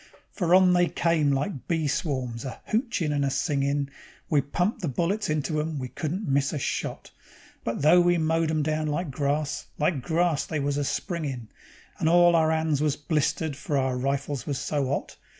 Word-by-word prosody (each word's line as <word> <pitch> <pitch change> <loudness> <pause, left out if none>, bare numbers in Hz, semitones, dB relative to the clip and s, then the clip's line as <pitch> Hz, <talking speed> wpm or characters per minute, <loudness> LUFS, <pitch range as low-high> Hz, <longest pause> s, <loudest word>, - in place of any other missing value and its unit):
For 175 -2 +2
on 185 -1 +6
they 175 0 +4
came 165 -5 +1
like 135 - -2
bee 165 -3 0
swarms, 130 -6 -2
a 130 - -6
hochin' 220 - 0
and 145 -1 +1
a 140 - +1
singin'; 140 0 0 0.4
We 145 -2 +4
pumped 180 +11 -1
the 175 - -1
bullets 175 - -1
into 155 0 0
'em, 155 0 -3
we 130 -2 -4
couldn't 175 - -4
miss 140 0 +1
a - - -1
shot. 135 - -3 0.5
But 115 +4 -3
though 170 +4 +7
we 175 0 +3
mowed 165 0 +1
'em 155 -1 +1
down 155 0 -1
like 150 +1 -2
grass, 145 +2 -1
like 150 -2 +1
grass 165 +2 0
was 145 -3 -1
they 145 - 0
a - - 0
springin', 140 - -3 0.5
And 160 - +2
all 175 0 +6
our 160 -1 +4
'ands 160 -2 +1
was 150 -2 +1
blistered, 150 0 -1
for 145 0 -2
our 130 -1 +1
rifles 135 0 -2
was 140 -3 -1
so 140 0 -1
'ot. - - -3
150 Hz, 190 wpm, -26 LUFS, 140-170 Hz, 0.5 s, though